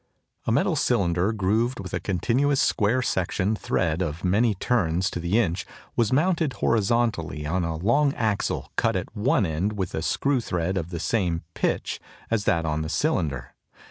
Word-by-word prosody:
A - - +2
metal - - +2
cylinder 90 +4 +1
grooved 110 +4 0
with 95 -2 -7
a 90 - 0
continuous 120 - +1
square 115 +5 +2
section 95 +1 0
thread 85 -4 -1
of 80 -2 -3
many 105 +4 +2
turns 95 -4 +1
to - - -4
the 85 +5 +1
inch 95 -6 +1 0.3
was 115 -3 +2
mounted 160 0 +2
horizontally 110 -10 0
on 85 +4 0
a 85 -1 -2
long 120 - +3
axle 110 -4 -1
cut - - +2
at - - -4
one 110 0 +2
end 85 +6 -1
with 95 -4 -3
a 80 - -2
screw 135 - +1
thread 90 -3 -2
of 85 -3 -2
the 85 -2 -5
same 90 -7 0
"pitch" - - -1 0.3
as 115 -3 +1
that 85 -4 +2
on 75 0 -1
the 80 - -3
cylinder. 80 - -1
95 Hz, 175 wpm, -25 LUFS, 85-115 Hz, 0.3 s, long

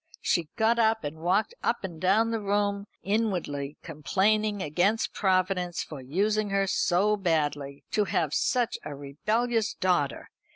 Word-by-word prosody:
She 165 -3 0
got 230 +1 +2
up 220 -2 +2
and 150 +2 -5
walked 185 - +1
up - - 0
and 170 -4 -6
down 215 +5 +3
the 225 - -1
room, 200 0 0 0.2
inwardly 180 -9 -1
complaining 205 +7 +1
against 185 +7 +1
Providence 185 -2 0
for 150 -4 -9
using 205 +10 0
her 195 0 +1
so 195 +2 +2
badly. 145 -7 -1
To 210 - +2
have 170 -6 0
such 245 +5 +1
a 145 - -6
rebellious 215 - -1
daughter! 175 -7 0
190 Hz, 140 wpm, -27 LUFS, 160-215 Hz, 0.2 s, down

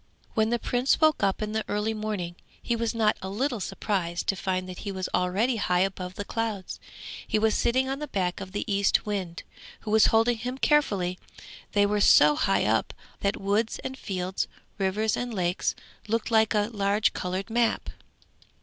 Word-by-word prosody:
When 220 0 +2
the 240 - +1
Prince 245 +3 +1
woke 310 -1 +4
up 200 +1 +1
in 210 - -3
the 220 0 -1
early 210 +2 -1
morning, 210 -5 -3 0.2
he 235 - -1
was 230 0 -1
not 215 -2 +2
a 190 - -5
little 240 +4 -1
surprised 180 -4 -2
to 195 - +2
find 185 -1 -2
that 180 -1 -8
he 200 - -4
was 190 -1 -3
already 205 +7 +1
high 180 -3 +1
above 185 -1 -2
the 205 - -5
clouds. 220 -5 -3 0.5
He - - +1
was 220 0 +2
sitting 260 +2 +2
on 270 +1 -3
the 300 - -4
back 180 -6 -2
of 190 -1 -7
the 205 - -3
Eastwind, 200 -3 0 0.4
who 215 - -5
was 220 0 +6
holding 225 +1 +3
him 250 +3 -4
carefully; 200 -12 +2 0.5
they 205 0 +4
were 205 0 +1
so 150 -5 +7
high 195 +5 +2
up - - +1 0.2
that 200 0 -1
woods 205 +3 0
and 265 0 -4
fields, 185 -6 -3 0.3
rivers 205 +3 +1
and 245 0 -3
lakes, 180 -1 0 0.3
looked 230 +2 -1
like 220 -1 +4
a 210 +2 +1
large 205 +1 +2
coloured 185 +4 -3
map. 235 0 +1
210 Hz, 185 wpm, -27 LUFS, 190-225 Hz, 0.5 s, so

